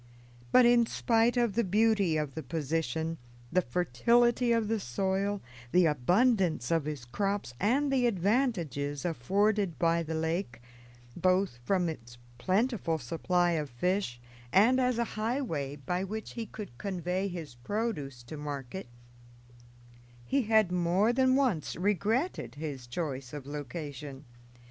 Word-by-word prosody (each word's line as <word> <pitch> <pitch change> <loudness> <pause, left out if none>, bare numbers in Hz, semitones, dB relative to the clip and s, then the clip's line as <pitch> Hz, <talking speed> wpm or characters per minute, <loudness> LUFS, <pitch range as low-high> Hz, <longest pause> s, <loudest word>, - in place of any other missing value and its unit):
But 255 - +7
in 240 -1 +5
spite 230 +2 +2
of 235 -4 +2
the 235 - +2
beauty 205 -4 +2
of 150 -3 -2
the 160 - -4
position, 160 +1 -2 0.3
the 185 - +3
fertility 235 - +2
of 230 -2 +2
the 225 0 0
soil, 195 +7 -1 0.3
the 180 -1 +5
abundance 175 - +2
of 165 -3 +2
his 150 -6 -5
crops, 200 - -2
and 270 +7 +2
the 250 -2 +3
advantages 180 - 0
afforded 195 - +1
by 170 +2 +2
the 160 0 -4
lake, 160 -6 -2 0.6
both 185 -7 +1
from 185 +1 +2
its 120 -7 -7 0.2
plentiful 195 - +1
supply 175 +5 0
of 155 -4 -1
fish 150 0 -1 0.3
and 230 +7 +5
as 250 -2 +1
a 235 - +2 0.2
highway 215 - -2
by 180 +6 -2
which 215 +3 -5
he 230 -2 -5
could 200 - -9
convey 185 0 -2
his 170 -7 -6
produce 140 - -3
to 140 +6 -8
market, 145 +2 -6 1.4
he 275 - +1
had 220 -4 +3
more 180 +6 +2
than 260 0 +3
once 250 - +1
regretted 205 - 0
his 145 -5 -6
choice 135 -2 -4
of 145 -3 -6
location. 145 -1 -7
180 Hz, 135 wpm, -30 LUFS, 150-220 Hz, 1.4 s, But